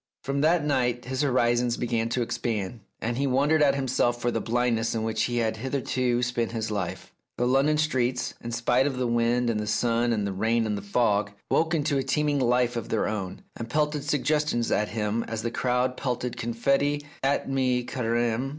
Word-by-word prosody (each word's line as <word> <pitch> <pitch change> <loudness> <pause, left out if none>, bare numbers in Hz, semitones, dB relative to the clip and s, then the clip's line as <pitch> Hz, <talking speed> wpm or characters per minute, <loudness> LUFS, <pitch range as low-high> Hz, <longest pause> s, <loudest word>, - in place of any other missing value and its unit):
From 140 +1 -1
that 160 0 +3
night 125 -4 0
his 130 +2 -2
horizons 120 -3 +2
began 115 -1 -1
to 120 +1 0
expand, 115 -2 -3 0.2
and 120 +1 -2
he 140 - +1
wondered 145 +4 +3
at 140 -2 +4
himself 125 -3 +1
for 120 0 0
the - - -1
blindness 115 -1 0
in 110 - -1
which 110 0 0
he 120 0 -2
had 110 -2 0
hitherto 125 -1 -1
spent 120 -2 -1
his 110 -1 -2
life. 100 -4 -4 0.3
The 120 - +1
London 135 +4 +3
streets, 130 -5 0
in 120 - -4
spite 120 +3 +2
of 135 -3 -3
the 125 - 0
wind 120 +1 +1
and 115 -2 0
the 105 - -3
sun 120 +2 +1
and 105 -3 0
the 100 - -2
rain 115 +4 +1
and 105 -1 -1
the 100 - -4
fog, 100 -1 +1 0.2
woke 165 +1 +2
into 145 -2 +1
a - - +1
teeming 145 +1 +1
life 125 -1 +2
of 115 -1 -4
their 110 - 0
own, 100 -4 -4
and 115 0 -6
pelted 150 +1 0
suggestions 150 -4 0
at 105 - +2
him 110 +1 -1
as 110 -1 -4
the 115 - -1
crowd 125 +1 0
pelted 125 -2 -2
confetti 140 +5 0 0.2
at 135 +1 +1
mi 130 -2 +1
careme. 120 +1 -1
120 Hz, 200 wpm, -26 LUFS, 115-135 Hz, 0.3 s, at